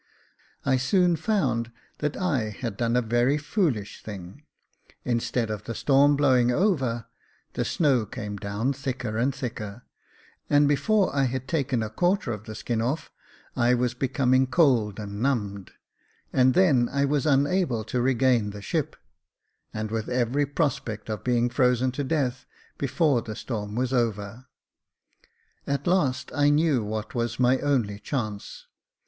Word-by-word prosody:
I 135 -1 +3
soon 175 +6 +3
found 155 - 0 0.3
that 150 -1 -2
I 140 - 0
had 105 +1 -5
done 115 +2 0
a 125 - +2
very 120 +5 +2
foolish 145 - -1
thing; 95 +4 -9 0.6
instead 120 -1 -1
of 105 -1 -5
the 115 - -5
storm 140 +3 +4
blowing 130 -4 +3
over, 130 - +1 0.5
the - - -1
snow 135 -9 +1
came 105 -5 -6
down 100 +7 -2
thicker 130 -5 -4
and 130 +4 +2
thicker; 120 -4 -6 0.7
and 145 0 +5
before 195 +6 +2
I 135 -1 +3
had 130 +1 -3
taken 135 -7 0
a 110 - -4
quarter 175 - +1
of 110 -1 -6
the 110 - -7
skin 115 0 -2
off, 130 +7 -2 0.4
I 120 +1 +3
was 125 0 0
becoming 130 0 +2
cold 125 - +2
and 100 0 -6
numbed, 105 -7 -1 0.6
and 130 -1 +4
then 140 -11 +4
I 140 0 +1
was 145 0 0
unable 145 -3 +2
to 120 +3 -2
regain 125 -3 +2
the 100 0 -8
ship, - - -2 0.8
and 110 0 -4
with 110 -1 -3
every 125 +3 +1
prospect 125 -8 -2
of 105 - -5
being 120 -1 +2
frozen 125 0 +2
to 145 +3 -3
death 135 -3 -1 0.3
before 140 -1 +2
the 110 -2 -7
storm 105 -3 -5
was 130 +2 -1
over. 115 0 -2 1.2
At 140 0 -1
last, 140 -8 +1
I 145 0 +3
knew 145 -5 +2
what 110 +1 -4
was 120 -1 -2
my 125 +1 +4
only 120 -8 0
chance. 105 -3 -5
125 Hz, 150 wpm, -26 LUFS, 115-140 Hz, 1.2 s, and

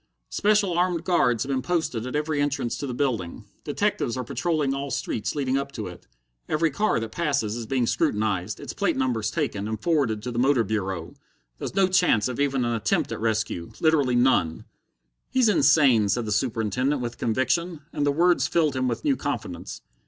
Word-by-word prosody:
"Special 205 -3 +2
armed 175 -2 +1
guards 125 - +2
have 140 - -4
been 130 -1 0
posted 145 -8 -1
at 130 - -5
every 150 -1 0
entrance 145 -5 -1
to 140 - -4
the 125 - -4
building. 120 -11 -2 0.2
Detectives 120 - -1
are 130 - -2
patrolling 150 +1 -1
all 140 +1 -3
streets 110 - -2
leading 135 -2 0
up 140 0 -5
to 110 - -5
it. 90 -1 -10 0.4
Every 155 +1 +1
car 210 - +1
that 115 -1 -5
passes 140 -10 -1
is 115 -2 -5
being 130 -1 +1
scrutinized, 105 -3 0
its - - -6
plate 200 -7 0
numbers 120 -5 0
taken, 100 -1 -2
and 110 -1 -3
forwarded 125 -7 0
to 125 - -3
the 120 - -2
Motor 130 -1 +3
Bureau. 95 -5 -3 0.5
There's - - -5
no 195 -1 +4
chance 180 - +3
of 125 0 -5
even 135 -3 +1
an 120 - 0
attempt 115 -3 0
at - - -4
rescue 110 -6 -1
literally 145 -6 +3
none." 120 -10 +2 0.6
"He's 255 -4 +3
insane," 130 - +4
said 115 +4 0
the 105 - -3
Superintendent, 120 +5 0
with 120 -1 -5
conviction, 130 +8 0
and 145 - -1
the 145 - +3
words 175 +4 +3
filled 155 -5 +1
him 130 -1 0
with 120 - -2
new 285 -2 +3
confidence. - - -5
130 Hz, 190 wpm, -25 LUFS, 110-155 Hz, 0.6 s, no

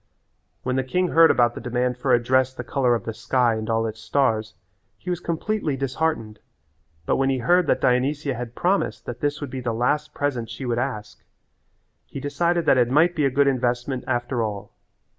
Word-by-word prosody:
When 130 0 -1
the 130 - +1
king 180 +8 0
heard 165 0 +6
about 120 -1 +3
the - - -8
demand 125 +1 -1
for 130 +2 -1
a 120 - +6
dress 130 +1 +2
the - - -5
colour 125 -4 +1
of 115 - -4
the 115 - -3
sky 120 +1 +1
and 110 0 -4
all 115 0 +1
its 110 0 -5
stars 110 -3 0 0.4
he 180 - -5
was 175 - -2
completely 170 -3 -2
disheartened, 135 -5 -2 0.7
but - - +1
when 135 0 +1
he 135 - +1
heard 175 +8 +3
that - - +1
Dionysia 135 +3 +1
had 120 0 -7
promised 190 +3 0
that 120 0 -6
this 145 +2 -2
would 140 -3 -5
be 130 - -5
the 120 -2 -2
last 150 +6 0
present 125 -6 -2
she 125 +3 -6
would 120 -1 -1
ask 125 -5 -5 0.8
he - - -7
decided 170 +5 0
that 130 - +4
it 120 -1 +3
might 160 +6 +4
be 150 - +1
a - - +3
good 140 +2 +2
investment 125 -1 0
after 120 -1 -1
all. 105 -3 -4
130 Hz, 205 wpm, -23 LUFS, 120-145 Hz, 0.8 s, heard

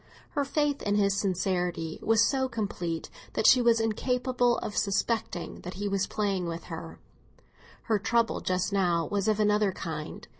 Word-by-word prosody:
Her 285 - 0
faith 290 0 0
in 205 0 0
his 200 -1 +3
sincerity 180 -4 -1
was 225 0 +4
so 265 -2 0
complete 190 -8 -3 0.2
that - - -1
she 255 - +7
was 235 -1 +4
incapable 245 +2 +1
of 210 - -5
suspecting 200 -4 -1
that 180 +1 -7
he 205 +2 -3
was 195 0 0
playing 195 -4 -1
with 165 0 -5
her; 165 0 -7 0.9
her 220 -3 +1
trouble 230 +2 +1
just 185 +2 -1
now 175 -4 +2
was 200 0 0
of 215 -1 +2
another 210 -1 +3
kind. 155 -4 -6
205 Hz, 160 wpm, -28 LUFS, 180-230 Hz, 0.9 s, she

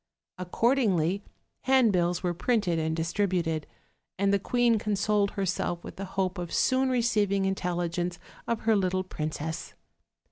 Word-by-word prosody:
Accordingly, 195 - +1 0.4
handbills 200 -10 +3
were 175 -1 0
printed 185 -3 +1
and 160 0 -1
distributed, 165 -2 -1 0.5
and 200 +1 +2
the 200 - +3
queen 235 +2 +2
consoled 205 0 +1
herself 180 -2 -1
with - - -9
the 195 - -4
hope 185 -1 0
of 175 -1 -5
soon 260 0 +2
receiving 210 -6 +1
intelligence 175 -2 -1 0.3
of 230 -1 -1
her 220 -1 +3
little 185 -1 +1
princess. 160 -2 -5
190 Hz, 130 wpm, -28 LUFS, 175-215 Hz, 0.5 s, handbills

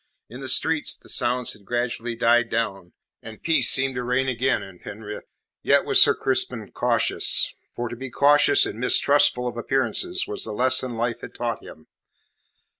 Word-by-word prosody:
In 125 - -9
the 135 -1 -6
streets 160 -2 -1
the - - -16
sounds 125 +1 -2
had 105 - -19
gradually 120 +1 -3
died 120 0 +2
down, 100 -6 -3 0.3
and 110 -1 -11
peace 165 -1 +4
seemed 135 0 +3
to 125 -1 -4
reign 125 +2 -1
again 130 +1 0
in 95 -2 -13
Penrith. 105 0 -9 0.4
Yet - - +2
was - - +5
Sir - - +5
Crispin - - -2
cautious - - +2 0.2
for 120 - -4
to 120 - -7
be 130 +2 -8
cautious 145 +4 +4
and 110 - -7
mistrustful 125 0 +3
of 120 -1 -6
appearances 355 - -1
was 415 -1 -3
the - - -5
lesson 125 +1 0
life 115 0 -3
had - - -11
taught 120 -1 -4
him. 80 - -14
120 Hz, 175 wpm, -23 LUFS, 115-135 Hz, 0.4 s, was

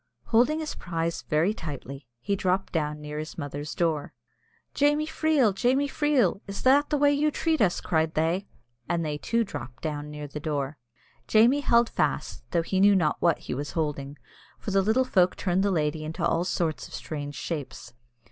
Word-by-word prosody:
Holding 250 +7 +4
his 310 - -4
prize 165 -1 -3
very 160 +7 +1
tightly, 140 - -7
he 200 +11 -1
dropped 185 0 -1
down 150 -2 -1
near 150 0 -5
his 155 +1 -7
mother's 145 0 -5
door. 160 -4 -1 0.6
"Jamie 295 +2 +2
Freel, 310 -8 +2
Jamie 260 +8 +2
Freel! 275 - +1
is 195 0 -6
that 280 +3 +5
the 295 - +1
way 290 0 +4
you 295 +2 +2
treat 320 0 0
us?" 185 -4 +3
cried 160 -1 0
they, 165 +5 0 0.4
and 170 -2 0
they 150 -1 -3
too 230 +8 +1
dropped 125 - -8
down 150 -1 -3
near 150 0 -7
the 145 +1 -6
door. 145 -2 -3 0.5
Jamie 235 +6 +5
held 235 -3 +4
fast, - - -2
though 170 -2 +1
he 190 +3 -1
knew 200 +1 +6
not 160 -5 +2
what 170 -3 +3
he - - -6
was 145 +3 -4
holding, 145 -3 -3 0.4
for 205 - -5
the 195 0 +4
little 220 +6 +2
folk 185 -7 +3
turned 185 0 0
the 200 - +2
lady 155 -3 0
into 155 +1 -3
all 165 +1 +2
sorts 160 -6 -1
of - - -9
strange 145 -2 -5
shapes. 140 -5 -6
170 Hz, 185 wpm, -27 LUFS, 150-230 Hz, 0.6 s, knew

